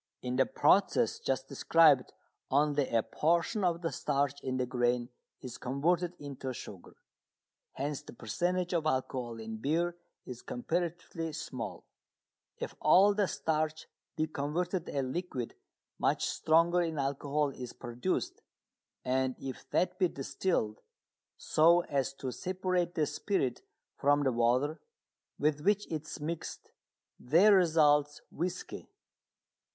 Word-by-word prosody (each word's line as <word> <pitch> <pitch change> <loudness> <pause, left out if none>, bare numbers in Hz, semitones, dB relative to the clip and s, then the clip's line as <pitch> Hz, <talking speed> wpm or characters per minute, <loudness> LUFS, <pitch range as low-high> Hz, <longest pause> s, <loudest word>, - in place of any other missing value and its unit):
In 125 0 -2
the 130 0 +3
process 200 +9 +3
just 135 0 -2
described 145 -1 +4 0.4
only 145 0 +2
a 115 -1 +2
portion 170 +7 +1
of 175 -1 +1
the 165 - 0
starch 140 0 -1
in 130 -1 -2
the 125 - 0
grain 120 -1 0 0.3
is 125 - -8
converted 170 +7 0
into 135 -2 -6
sugar, 100 -6 -10 0.8
hence 140 +1 -3
the - - -12
percentage 175 - -1
of 160 -2 +1
alcohol 130 -4 -2
in 110 0 -6
beer 165 +8 0 0.3
is 125 -2 -8
comparatively 165 +3 -3
small. 130 -6 -6 0.7
If - - -5
all 190 +7 +6
the 200 -1 +1
starch 155 -1 -1 0.3
be 155 - +1
converted 165 +4 -2
a 140 - -1
liquid 130 -3 -4 0.5
much - - +1
stronger 165 +2 +3
in 165 -2 -2
alcohol 140 +1 0
is 125 -2 -7
produced, 120 0 -3 0.6
and 130 0 +1
if 135 -1 -7
that 180 0 0
be 185 - +4
distilled, 135 - -2 0.6
so 170 +3 +4
as 135 -5 -1
to 130 -1 -4
separate 180 +1 -1
the 155 - +2
spirit 135 - -1 0.4
from 145 +1 +3
the 135 - +2
water 125 +6 +1 0.6
with 150 0 +1
which 205 +4 +2
it 155 -1 -3
is - - -7
mixed, 160 +2 -5 0.5
there 170 +11 +5
results 150 -5 +4
whisky. 175 +3 -4
150 Hz, 130 wpm, -31 LUFS, 130-170 Hz, 0.8 s, all